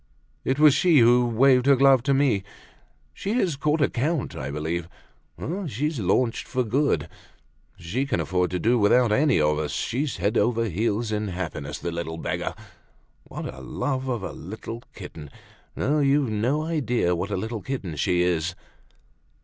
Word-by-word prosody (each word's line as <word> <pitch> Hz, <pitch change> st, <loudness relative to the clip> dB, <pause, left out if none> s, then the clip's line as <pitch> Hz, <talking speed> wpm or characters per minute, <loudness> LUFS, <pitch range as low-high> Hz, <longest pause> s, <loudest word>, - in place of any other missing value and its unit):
It 130 Hz, -, 0 dB
was 150 Hz, -1 st, +7 dB
she 170 Hz, 0 st, +4 dB
who 120 Hz, 0 st, +5 dB
waved 125 Hz, +2 st, +4 dB
her 140 Hz, -, +7 dB
glove 135 Hz, -1 st, +5 dB
to 140 Hz, -, +3 dB
me. 135 Hz, -8 st, +2 dB, 0.7 s
She 200 Hz, -, -3 dB
has 190 Hz, -, +1 dB
caught 150 Hz, +3 st, 0 dB
a -, -, +4 dB
count, 145 Hz, +4 st, -2 dB
I 65 Hz, -, -5 dB
believe. 80 Hz, +4 st, -3 dB, 0.5 s
Oh! 180 Hz, +3 st, -4 dB
she's 150 Hz, +3 st, -2 dB
launched 115 Hz, +5 st, 0 dB
for 130 Hz, -, 0 dB
good. 135 Hz, +6 st, 0 dB, 0.7 s
She 120 Hz, +12 st, -3 dB
can 135 Hz, -, 0 dB
afford 90 Hz, +3 st, 0 dB
to 90 Hz, -, -2 dB
do 120 Hz, +6 st, +2 dB
without 115 Hz, +3 st, +4 dB
any 140 Hz, +4 st, +3 dB
of 75 Hz, 0 st, +2 dB
us; 75 Hz, -1 st, -2 dB
she's 140 Hz, +4 st, -2 dB
head 100 Hz, +6 st, +1 dB
over 115 Hz, -1 st, +1 dB
heels 110 Hz, +3 st, -1 dB
in 105 Hz, 0 st, -1 dB
happiness, 80 Hz, -6 st, -5 dB
the 85 Hz, -, -4 dB
little 85 Hz, -1 st, -4 dB
beggar! -, -, -3 dB, 0.7 s
What -, -, -6 dB
a 65 Hz, -, -11 dB
love 130 Hz, -, -3 dB
of 120 Hz, -5 st, -2 dB
a -, -, -4 dB
little 110 Hz, +5 st, -8 dB
kitten! 75 Hz, -3 st, -9 dB, 0.5 s
No, 150 Hz, +3 st, +1 dB
you've 140 Hz, -3 st, +2 dB
no 125 Hz, +9 st, 0 dB
idea 125 Hz, -, 0 dB
what 90 Hz, +4 st, -3 dB
a 100 Hz, -, -2 dB
little 110 Hz, +2 st, -4 dB
kitten 100 Hz, -, -4 dB
she 90 Hz, +5 st, +1 dB
is!" 85 Hz, -1 st, 0 dB
115 Hz, 175 wpm, -25 LUFS, 90-140 Hz, 0.7 s, was